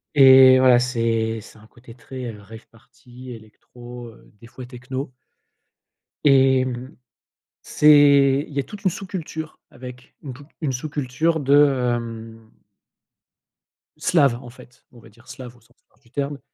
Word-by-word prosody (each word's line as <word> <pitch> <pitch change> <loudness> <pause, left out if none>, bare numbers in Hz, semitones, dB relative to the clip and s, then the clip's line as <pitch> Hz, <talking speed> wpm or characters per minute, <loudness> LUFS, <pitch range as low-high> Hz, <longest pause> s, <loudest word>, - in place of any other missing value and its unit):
Et 130 -1 +7
voilà, 130 -1 +5
c'est 115 -2 -2
c'est 110 - -16
un 110 0 -19
côté 120 0 -17
très, 130 +1 -10
heu, 105 - -14
rave 110 +2 -14
party, 125 +2 -16
électro, 120 +2 -13
heu, 115 - -20
des 115 - -14
fois 125 +2 -11
techno. 130 +2 -8 1.1
Et 135 -2 +3
mmh, 130 +3 -7 0.7
c'est 145 -2 +4
il 145 - -13
y - - -3
a - - -3
toute 205 +8 -13
une 190 - +2
sous-culture 165 -4 -8
avec, 125 +1 -13
une 140 - -8
tou 140 +3 -15 0.2
une 145 -4 -1
sous-culture 145 +4 -3
de, 135 -3 +2
hem 115 -1 -10 1.5
slave, 140 -8 +1
en 125 - -12
fait, 120 0 -19
on 120 - -18
va 115 - -18
dire 120 +3 -24
slave 125 -2 -11
au 120 - -24
sens 120 +2 -30
large 110 - -35
du 115 -3 -28
terme, 140 0 -4
130 Hz, 155 wpm, -21 LUFS, 120-140 Hz, 1.5 s, Et